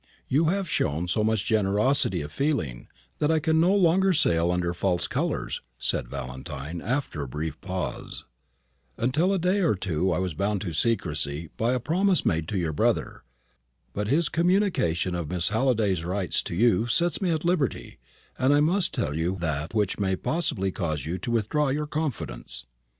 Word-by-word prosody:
"You 150 +5 +2
have 190 +3 0
shown 80 - 0
so 105 +5 +1
much 110 -2 +1
generosity 105 - +2
of 75 - -8
feeling, 85 - -1 0.3
that 150 - +2
I 160 - +3
can 160 +1 +2
no 180 +4 +4
longer 190 0 +4
sail 85 - +3
under 90 -1 0
false 90 0 0
colours," - - -2 0.2
said - - -1
Valentine, 70 +6 -6
after 125 - -2
a 70 - -4
brief 75 +4 -5
pause. 95 -1 -5 0.7
"Until 150 +11 +1
a 195 - +2
day 185 +3 +1
or 165 - +2
two 90 -3 -2
ago 95 - +2
I - - 0
was 90 -2 -1
bound 100 +5 -1
to 90 -6 -4
secrecy 80 -6 -1
by 115 +3 +1
a 130 - +1
promise 180 - +2
made 80 -1 +1
to 100 - -2
your 85 -3 -1
brother. - - 0 0.7
But 105 0 -2
his 150 +7 +2
communication 170 - +1
of 85 -4 -3
Miss 90 -1 +1
Halliday's 110 -6 +1
rights 90 +1 -1
to - - -4
you 115 +1 +3
sets 170 +7 +1
me 185 - +1
at 160 -1 -1
liberty, 170 - -1 0.4
and 135 +3 +4
I - - +4
must 170 +5 +1
tell 75 - -1
you 85 +4 0
that 80 0 -3
which 105 -2 0
may 95 -2 +1
possibly 95 - -1
cause 80 -7 -3
you 85 +4 -3
to 105 - -5
withdraw 120 +6 +1
your 150 +3 -1
confidence." 95 - -4
100 Hz, 180 wpm, -26 LUFS, -, 0.7 s, no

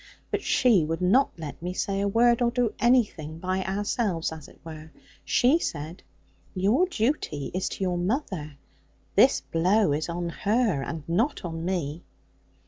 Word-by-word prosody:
But - - -1
she 230 -10 +3
would 165 +2 -2
not 215 +10 +3
let 155 -3 -8
me 180 +1 -3
say 195 0 -1
a 200 - +1
word, 235 +3 +3
or 240 - +3
do 240 -2 0
anything 210 -11 +1
by 185 +2 -2
ourselves, 195 -3 -1
as 155 -2 -9
it - - -18
were: 155 -1 -9 0.3
she 270 +7 +3
said, 160 - -5 0.5
'Your 210 - +2
duty 225 - -2
is 185 +1 -1
to - - -5
your 180 -2 0
mother: 180 - -3 0.6
this - - +5
blow 185 +1 +2
is 155 +3 -2
on 170 0 -3
her, 205 - 0
and 160 +2 -6
not 210 - 0
on 165 -1 -5
me.' 170 -3 -2
185 Hz, 160 wpm, -26 LUFS, 165-230 Hz, 0.6 s, this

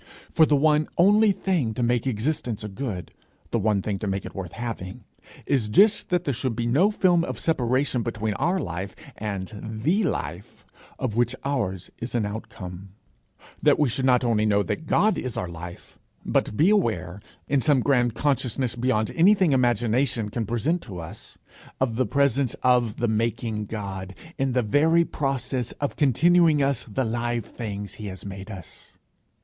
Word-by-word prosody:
For 160 - +5
the 150 - +4
one 150 +1 +3
only 205 +4 +5
thing 170 - -1
to 125 - -1
make 120 +1 +1
existence 120 -1 -2
a - - -3
good, 100 -3 -5 0.4
the 115 - +1
one 105 -2 +1
thing 100 -2 -2
to 105 - -3
make 95 0 -2
it - - -8
worth 90 -4 -6
having, 115 -2 -6 0.4
is 125 -7 +1
just 205 - +4
that 180 -1 +1
there 140 - -1
should 125 -1 -2
be 120 +1 -2
no 145 - +4
film 180 -5 +3
of - - -4
separation 130 -4 +1
between 110 -2 -2
our 175 - 0
life 95 - -5 0.2
and 100 -1 -5 0.3
the 190 - +3
life 85 - -4 0.3
of 125 -5 -2
which 120 +1 +2
ours 100 -10 -2
is 120 +1 -5
an 115 -3 +1
outcome; 100 -3 -7 0.7
that - - +4
we 150 -4 +2
should 130 +3 -1
not 125 -1 +4
only 110 -3 +2
know 105 -1 +3
that 160 - -4
God 215 +1 +3
is 130 -3 -4
our 90 - -2
life, 85 +1 -10 0.3
but 105 - 0
be 175 +6 +5
aware, 100 - 0 0.3
in 140 0 +2
some 140 -1 +3
grand 120 -4 +2
consciousness 130 -3 0
beyond 115 -3 0
anything 185 -1 +4
imagination 120 -2 +1
can 115 0 -3
present 135 +10 0
to 100 -7 -9
us, 85 +6 -9 0.4
of 125 -4 0
the 130 -2 +1
presence 140 +1 +1
of 125 -4 +3
the 120 - -1
making 110 -1 -1
God, 95 -3 -6 0.2
in 135 -1 +1
the 125 -1 +2
very 160 +9 +3
process 130 -4 -2
of 145 -6 -3
continuing 155 +2 +4
us 135 -3 0
the 130 +3 -2
live 120 0 -1
things 105 -3 -6
he 105 - -7
has 95 0 -8
made 95 +1 -7
us. 95 -6 -10
120 Hz, 175 wpm, -25 LUFS, 105-140 Hz, 0.7 s, For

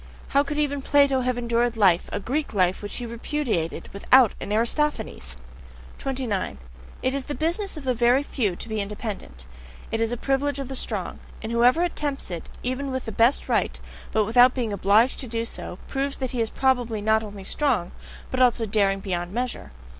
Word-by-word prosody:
How 280 - +4
could 290 +1 -3
even 285 -2 0
Plato 280 -1 +4
have 250 -1 0
endured 235 0 0
life 185 -5 +4
a - - -2
Greek 265 +3 -2
life 185 -1 +2
which 205 - -4
he 245 - -3
repudiated 235 - -2
without 240 +3 +5
an - - -5
Aristophanes! 220 - 0 0.6
29. 255 - -2 0.5
It 260 - +1
is 275 -1 -2
the 290 - -4
business 345 +4 -1
of 305 - -7
the 255 -1 +1
very 245 +3 +3
few 215 -10 -1
to - - -7
be 220 -1 -2
independent; 200 - -6 0.5
it 225 - -1
is 225 0 +1
a 245 - -2
privilege 275 +3 0
of 275 -2 -4
the 265 - -5
strong. - - -2 0.2
And 220 - -4
whoever 245 +8 +4
attempts 290 - -3
it, 170 -2 -6
even 255 +3 -2
with 260 -1 -3
the 225 - -4
best 230 +6 +3
right, - - 0 0.3
but 215 -1 +2
without 245 +4 +6
being 235 -5 -1
OBLIGED 205 +6 +3
to 260 - 0
do 230 0 -2
so, 180 - -5
proves 275 0 -2
that 260 -2 -3
he 245 - -1
is 225 - 0
probably 245 -5 +1
not 220 +1 +3
only 205 -2 -8
strong, 190 -6 0 0.4
but 260 - -1
also 240 -2 +4
daring 195 -2 +1
beyond 175 -2 -3
measure. 240 - -3
240 Hz, 190 wpm, -25 LUFS, 210-270 Hz, 0.6 s, without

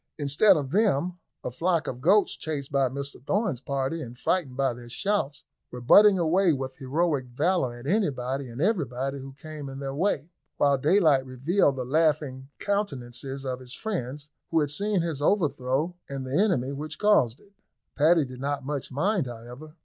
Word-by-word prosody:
Instead 155 +7 +4
of 140 -3 -3
them, 180 -3 +1 0.2
a - - -3
flock 165 +5 0
of 125 0 -5
goats, 195 +7 +4
chased 145 -4 -4
by 135 -2 +2
Mr 140 -1 -6
Thorn's 195 - -1
party, 140 +4 -2
and 125 -3 -8
frightened 135 -4 -1
by 135 -2 +1
their 120 0 -11
shouts, 175 - -1 0.3
were 125 - -6
butting 200 - +7
away 175 +2 +3
with 130 -1 -4
heroic 140 0 0
valour 135 0 0
at 120 +1 -11
anybody 140 - -1
and 120 +2 -9
everybody 135 - -1
who 135 0 -8
came 150 0 -8
in 135 - -7
their 135 -1 -4
way, 165 -1 -1 0.3
while 140 -1 +4
daylight 155 -3 +4
revealed 135 +5 +1
the 130 -2 -4
laughing 145 -2 0
countenances 135 - -3
of 130 -1 -3
his 125 -1 -5
friends, 150 - -5 0.2
who 165 - +2
had 145 -2 0
seen 200 +3 0
his 160 -4 -3
overthrow 145 -2 +1 0.2
and 135 -1 -4
the 130 +2 -3
enemy 155 - +2
which 150 +2 -6
caused 140 - +3
it. 200 - -23 0.4
Paddy 155 +1 +4
did 130 -1 -10
not 140 -1 -2
much 145 -1 -4
mind, 170 +3 0
however. 125 +6 -10
140 Hz, 175 wpm, -26 LUFS, 130-170 Hz, 0.4 s, butting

